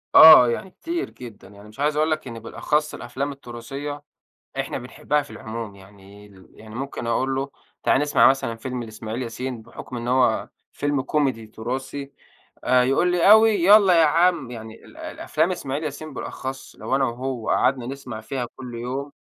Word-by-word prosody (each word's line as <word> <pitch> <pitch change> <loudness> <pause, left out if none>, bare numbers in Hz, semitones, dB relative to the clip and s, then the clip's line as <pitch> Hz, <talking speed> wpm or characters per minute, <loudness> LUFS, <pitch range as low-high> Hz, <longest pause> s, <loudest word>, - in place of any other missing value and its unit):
آه. 155 -6 +11
يعني 120 +10 -3
كتير 340 - -4
جدًا. 120 -5 -12
يعني 100 +1 -15
مش 110 - -17
عايز 150 +1 +1
أقول 155 +1 +2
لك 155 -3 -2
إن 115 -2 -7
بالأخص 150 +6 -1
الأفلام 140 +2 -4
التُراثية، 140 +3 -7 0.6
إحنا - - -3
بنحبها 150 0 -1
في 145 - -15
العموم. 110 -2 -7
يعني 100 +1 -16
ال 95 -2 -18
يعني 110 0 -13
ممكن 135 -1 -5
أقول 130 +3 0
له: 135 +1 -2 0.3
"تعالَ - - +3
نسمع 145 0 +4
مثلًا 130 -3 0
فيلم 125 +1 -5
لإسماعيل 110 +2 -6
ياسين، 125 0 -5
بحُكم 125 +3 -9
إن 120 0 -4
هو 125 -3 +2 0.2
فيلم 145 -2 -1
كوميدي 130 -7 0
تُراثي." 130 +5 -5 0.5
آآ 125 0 +4
يقول 135 +8 +2
لي: 180 +2 +4
"أوي، 220 +1 +8
يالّا 195 -2 +7
يا - - +6
عم." 165 -4 +2
يعني 110 -2 -9
ال - - -16
الأفلام - - -2
إسماعيل 140 +3 -4
ياسين 155 +1 -6
بالأخص 135 0 -6
لو 135 - -1
أنا 135 - +2
وهو 125 -1 -3
قعدنا 125 -1 +2
نسمع 130 -4 -7
فيها 125 +2 -4
كل 125 -2 -8
يوم 130 +4 -4
130 Hz, 175 wpm, -23 LUFS, 115-145 Hz, 0.6 s, آه